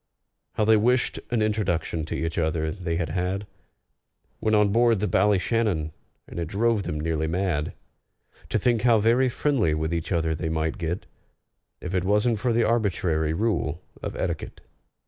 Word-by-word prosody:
How 110 Hz, -, +1 dB
they 110 Hz, 0 st, +6 dB
wished 125 Hz, +4 st, +1 dB
an 120 Hz, -3 st, +1 dB
introduction 85 Hz, -7 st, -1 dB
to -, -, -4 dB
each 80 Hz, +1 st, -2 dB
other 80 Hz, -1 st, 0 dB
they 85 Hz, -2 st, -3 dB
had 80 Hz, -2 st, -1 dB
had 90 Hz, +4 st, -2 dB, 0.9 s
When 110 Hz, 0 st, +2 dB
on 105 Hz, -1 st, +4 dB
board 115 Hz, 0 st, +3 dB
the 105 Hz, -, 0 dB
Ballyshannon! 100 Hz, -4 st, +1 dB, 0.4 s
And -, -, -7 dB
it 85 Hz, -, -2 dB
drove 110 Hz, +4 st, +1 dB
them 75 Hz, -5 st, -4 dB
nearly 80 Hz, 0 st, -1 dB
mad 85 Hz, -3 st, -1 dB, 0.8 s
To -, -, +1 dB
think 120 Hz, -3 st, +2 dB
how 120 Hz, -2 st, +5 dB
very 120 Hz, +5 st, +3 dB
friendly 120 Hz, -, +1 dB
with 80 Hz, +2 st, -2 dB
each 85 Hz, +2 st, -3 dB
other 80 Hz, -2 st, +1 dB
they 80 Hz, +1 st, -3 dB
might 80 Hz, 0 st, -1 dB
get, 85 Hz, +1 st, -3 dB, 0.8 s
If 90 Hz, -, -5 dB
it 90 Hz, -2 st, +1 dB
wasn't 105 Hz, +3 st, +2 dB
for 125 Hz, +3 st, 0 dB
the 115 Hz, 0 st, +3 dB
arbitrary 90 Hz, -8 st, +1 dB
rule 110 Hz, +6 st, -1 dB, 0.2 s
of -, -, -5 dB
etiquette! -, -, -4 dB
95 Hz, 165 wpm, -25 LUFS, 80-110 Hz, 0.9 s, they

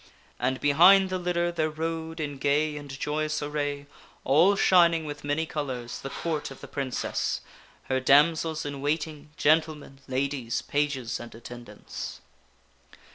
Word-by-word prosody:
And 130 Hz, +1 st, 0 dB
behind 185 Hz, +7 st, +6 dB
the 185 Hz, -, -1 dB
litter 175 Hz, -1 st, 0 dB
there 160 Hz, -2 st, 0 dB
rode 160 Hz, +1 st, -4 dB
in 145 Hz, -3 st, -4 dB
gay 150 Hz, +3 st, +1 dB
and 145 Hz, -1 st, -8 dB
joyous 155 Hz, +1 st, -1 dB
array, 145 Hz, -1 st, -3 dB, 0.4 s
all 165 Hz, +9 st, +5 dB
shining 170 Hz, -4 st, +4 dB
with 145 Hz, -1 st, -7 dB
many 145 Hz, +3 st, 0 dB
colors, 130 Hz, -6 st, -4 dB
the 135 Hz, -, -5 dB
Court 155 Hz, 0 st, -3 dB
of 135 Hz, -, -11 dB
the -, -, -10 dB
Princess 135 Hz, -3 st, -2 dB, 0.4 s
her 130 Hz, 0 st, 0 dB
damsels 155 Hz, +4 st, +3 dB
in 140 Hz, -1 st, -5 dB
waiting, 150 Hz, 0 st, -2 dB
gentlemen, 155 Hz, -3 st, +1 dB
ladies, 130 Hz, -2 st, -2 dB
pages, 140 Hz, -5 st, -1 dB
and 120 Hz, -1 st, -10 dB
attendants. 120 Hz, -2 st, -8 dB
150 Hz, 135 wpm, -27 LUFS, 135-160 Hz, 0.4 s, behind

